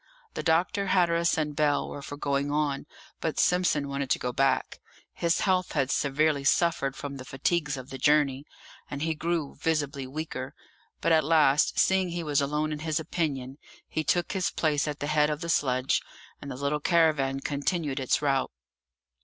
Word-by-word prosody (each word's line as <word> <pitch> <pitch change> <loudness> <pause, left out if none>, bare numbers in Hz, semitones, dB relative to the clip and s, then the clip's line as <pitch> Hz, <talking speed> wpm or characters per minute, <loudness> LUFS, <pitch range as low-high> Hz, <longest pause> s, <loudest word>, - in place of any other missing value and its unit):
The - - -3
doctor, 175 +4 +1
Hatteras, 170 -3 +2
and 150 -2 -1
Bell 150 -1 +1
were 145 - -7
for 145 +1 -8
going 140 0 -1
on, 145 -1 -1 0.3
but 160 - -2
Simpson 180 -5 +2
wanted 140 -1 -3
to - - +3
go 125 0 -3
back; 135 +2 +1 0.3
his 170 0 0
health 185 -2 +1
had 135 -2 +1
severely 145 0 +1
suffered 140 -2 +2
from 140 0 -6
the 130 - -8
fatigues 150 +3 -1
of 130 +1 -9
the 135 - -6
journey, 145 -1 +3 0.5
and 145 +1 -4
he 160 0 0
grew 160 -1 -2
visibly 145 -4 -2
weaker; 135 -1 -5 0.5
but - - +2
at 160 -1 +5
last, 150 -2 +3
seeing 190 -1 +3
he 170 0 -3
was 145 -2 +1
alone 150 +2 -1
in 150 - -4
his 155 0 -1
opinion, 140 -4 -3 0.3
he 155 - -2
took 175 +3 +1
his 190 -3 0
place 150 -2 0
at 150 -1 -4
the - - -1
head 150 0 +2
of 150 +1 -3
the 170 - -4
sledge, 130 -4 +1 0.4
and 140 - -7
the 130 - -5
little 140 +3 -1
caravan 150 -5 +2
continued 145 0 -2
its 130 +3 0
route. 135 -2 +1
150 Hz, 180 wpm, -27 LUFS, 140-160 Hz, 0.5 s, at